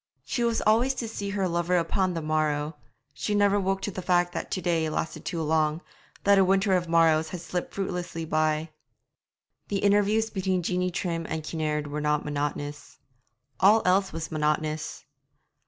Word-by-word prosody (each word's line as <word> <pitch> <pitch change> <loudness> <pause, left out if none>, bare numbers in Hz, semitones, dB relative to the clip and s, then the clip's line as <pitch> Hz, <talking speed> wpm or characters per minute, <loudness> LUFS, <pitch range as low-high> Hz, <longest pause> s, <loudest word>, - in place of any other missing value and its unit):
She 240 - -1
was 230 -1 +1
always 235 +5 +3
to 235 - -3
see 200 -2 -4
her 200 -2 0
lover 175 +1 +1
upon 180 +2 0
the 165 - -3
morrow; 155 0 0 0.4
she 210 +8 -2
never 205 0 +3
woke 195 0 -1
to 205 - -2
the 185 - -5
fact 175 -1 +2
that - - -4
'to - - -2
day' 165 -3 0
lasted 155 +1 -4
too 165 -2 -2
long, 155 0 +1 0.4
that 200 -1 +5
a - - +6
winter 195 +1 +3
of 175 -2 -1
morrows 160 -1 +4
had 180 - -5
slipped 175 +1 -4
fruitless 180 -3 -3
by. 155 0 0 1.0
The 200 - -1
interviews 205 +2 +2
between 190 -2 -1
Jeanie 180 +2 0
Trim 170 -2 -3
and 160 -1 -3
Kinnaird 155 -1 -2
were 150 +1 -4
not 150 0 0
monotonous. 145 0 -4 0.6
All 210 +4 +5
else 190 +1 +3
was 165 0 -5
monotonous. 155 0 -1
175 Hz, 170 wpm, -27 LUFS, 155-195 Hz, 1.0 s, a